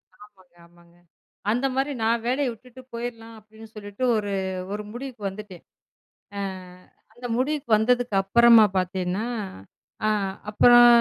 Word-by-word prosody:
ஆமாங்க, 190 -4 -20
ஆமாங்க. 170 0 -23 0.6
அந்தமாரி 270 +4 0
நான் 230 +1 +1
வேலைய 265 +3 +1
விட்டுட்டு 250 +3 -15
போயிர்லாம், 230 -1 -6
அப்பிடின்னு 220 +1 -16
சொல்லிட்டு 205 +2 -7
ஒரு, 205 -1 -3 0.4
ஒரு 210 0 -4
முடிவுக்கு 245 -3 -8
வந்துட்டேன். 195 -3 -11 0.7
அ - - -3 0.8
அந்த 245 0 -7
முடிவுக்கு 285 +1 -2
வந்ததுக்கு 245 0 +1
அப்பறமா 230 +3 +6
பார்த்தேன்னா, 185 +2 -2 0.8
அ - - +3 0.4
அப்பறம் 240 +3 +7
225 Hz, 115 wpm, -24 LUFS, 205-245 Hz, 0.8 s, அப்பறம்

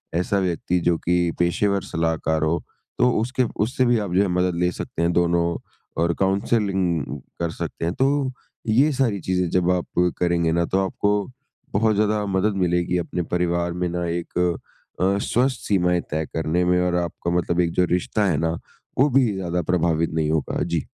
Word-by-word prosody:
ऐसा 90 +3 +1
व्यक्ति 90 0 0
जो 85 -1 +3
कि 85 0 +1
पेशेवर 100 +3 +1
सलाहकार 80 -1 -1
हो 80 +2 +1 0.4
तो 125 - +5
उसके 125 +3 0 0.2
उससे 125 +2 0
भी 120 -1 +3
आप 100 -4 -3
जो 95 - +4
है 100 - +2
मदद 90 0 +1
ले 90 0 +2
सकते 85 - -5
हैं 85 +1 +2
दोनों 85 0 +2 0.6
और 85 0 +2
काउंसलिंग 95 - +1 0.4
कर 85 -1 -1
सकते 80 - -5
हैं। 85 - -1
तो 135 - +4 0.6
ये 130 +8 +4
सारी 120 -7 +1
चीज़ें 90 0 0
जब 90 0 +2
आप 90 -1 -1 0.3
करेंगे 85 -2 +2
ना, 85 +1 +1
तो 95 - 0
आपको 100 +1 0 0.5
बहुत 110 +1 +2
ज़्यादा 105 0 +1
मदद 100 +1 0
मिलेगी 90 0 +1
अपने 90 +1 -2
परिवार 85 -1 0
में 90 0 -1
ना 85 0 -2
एक 85 +1 -4 0.6
अ, 95 +2 +3
स्वस्थ 125 +5 +1
सीमाएँ 90 -3 +2
तय 80 +1 -1
करने 80 +2 0
में 90 0 +3
और 90 -1 +1
आपका 85 +1 -4
मतलब 85 0 0
एक 85 - 0
जो 90 - +5
रिश्ता 105 +4 0
है 80 - +1
ना 80 +1 0 0.4
वो 145 +2 +5
भी 125 -4 +3
ज़्यादा 90 -2 -2
प्रभावित 85 -2 +1
नहीं 80 -1 0
होगा। 80 -2 -1
जी। 85 -1 -1
90 Hz, 185 wpm, -23 LUFS, 85-100 Hz, 0.6 s, तो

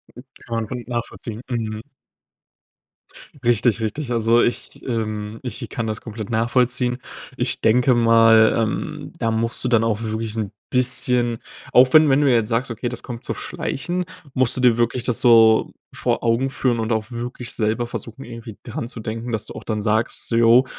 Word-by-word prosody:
Mhm. 125 - -11 0.2
Kann 115 - -4
man 115 -1 -2
voll 125 +2 -6
nachvollziehen. 120 -2 -5
Mhm. 110 -3 -3 1.6
Richtig, 115 -1 +2
richtig. 125 +4 -3
Also, 115 0 +3
ich, 120 - -2
ähm 110 -2 -3
ich 125 -4 -4
kann 115 - -3
das 110 0 -4
komplett 110 -2 -7
nachvollziehen. 125 +2 +1 0.4
Ich - - -1
denke 125 +3 +4
mal, 115 -1 +5
ähm, 110 -2 -3
da 115 - 0
musst 115 +1 -2
du - - 0
dann 115 -2 +3
auch 115 -1 0
wirklich 110 -1 -3
'n 105 -3 -3 0.2
bisschen 125 -2 +3 0.3
auch 130 +1 +5
wenn 155 -1 +7
wenn 135 +2 +4
du 140 -2 +4
jetzt 115 -3 +2
sagst: 120 +2 0
„Okay, 115 +2 -3
das 120 -1 -5
kommt 120 -1 -8
so - - -2
schleichend.“ 180 +5 -3 0.3
Musst 130 -1 +1
du - - -1
dir 120 -2 +4
wirklich 120 +1 0
das 125 -2 +1
so 115 -2 +5 0.2
vor - - -1
Augen 120 +3 +1
führen 130 -3 0
und 110 +1 -2
auch 110 0 -2
wirklich 120 0 -5
selber 115 +2 0
versuchen, 120 +2 -5
irgendwie 115 -3 -9
daran 115 - -5
zu 120 - -6
denken, 115 +2 -5
dass 110 -2 -1
du - - -6
auch - - -9
dann 110 -2 -3
sagst 110 +2 0
so: 115 - -1
„Jo, 115 +2 +5
115 Hz, 185 wpm, -21 LUFS, 110-125 Hz, 1.6 s, wenn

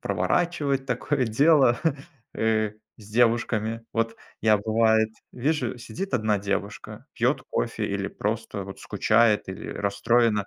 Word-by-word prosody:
проворачивать 145 -6 0
такое 130 +2 0
дело, 135 0 +4 0.6
э, 110 -1 +1 0.3
с 105 -1 -14
девушками. 115 -1 +1
Вот 115 0 0 0.3
я 110 -2 +5
бывает, 110 +1 +3 0.2
вижу, 130 -1 -1
сидит 190 +11 -6
1 110 -3 +2
девушка, 100 +2 -4
пьёт - - +1
кофе - - -2
или - - -2
просто - - -3
вот - - -9
скучает, 110 -4 +2
или 95 - -7
расстроена. 105 +1 +1
115 Hz, 120 wpm, -25 LUFS, 110-125 Hz, 0.6 s, я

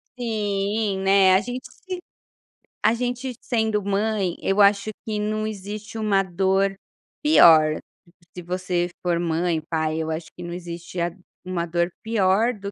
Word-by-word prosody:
Sim, 205 -3 -1
né, 195 -1 +5
a 190 - +4
gente 250 +2 -6
se 370 -1 -7 0.8
a 220 - +5
gente 245 +1 -3
sendo 220 -3 0
mãe 200 -2 0
eu 195 +2 +1
acho 200 +1 +4
que 215 -1 -2
não 215 +1 -1
existe 210 +1 -6
uma 200 -3 +2
dor 190 +2 +1 0.5
pior. 160 - +6 0.6
Se 180 - -6
você 180 0 -1
for 175 -2 +1
mãe, 165 -1 0
pai, 160 -1 0
eu 160 0 -2
acho 160 0 -4
que 175 - -9
não 175 0 -6
existe 175 0 -6
a 170 +1 0 0.3
uma 180 -2 -2
dor 170 +1 0
pior 220 +1 +2
do 200 -1 -7
195 Hz, 150 wpm, -23 LUFS, 175-215 Hz, 0.8 s, pior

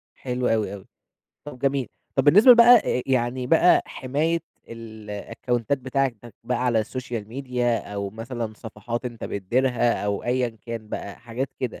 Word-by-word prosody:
حلو 125 -1 -2
أوي 110 -2 0
أوي، 100 - -9 0.6
طب 145 -4 -8
جميل، 135 -1 0 0.3
طب 135 - +2
بالنسبة 205 - +7
لبقى 235 -1 +7
أ 210 - 0
أ - - -3
يعني 125 -1 0
بقى 165 +5 +5
حماية 155 +6 -1 0.3
الأكونتات 115 +3 -4
بتاعتك 130 -3 -2
بقى 125 0 -1
على 115 -2 +2
السوشيال 115 -2 -5
ميديا 125 -2 -1 0.2
أو 100 -1 -3
مثلًا 115 0 -5
صفحات 115 +2 -6
أنت 120 -2 -6
بتديرها، 120 +3 0
أو 100 -1 -2
أيًا 125 0 +1 0.2
كان 115 -2 -6
بقى 100 -1 -6
حاجات 120 +3 -4
كده، 125 -3 -4
120 Hz, 155 wpm, -24 LUFS, 115-130 Hz, 0.6 s, بالنسبة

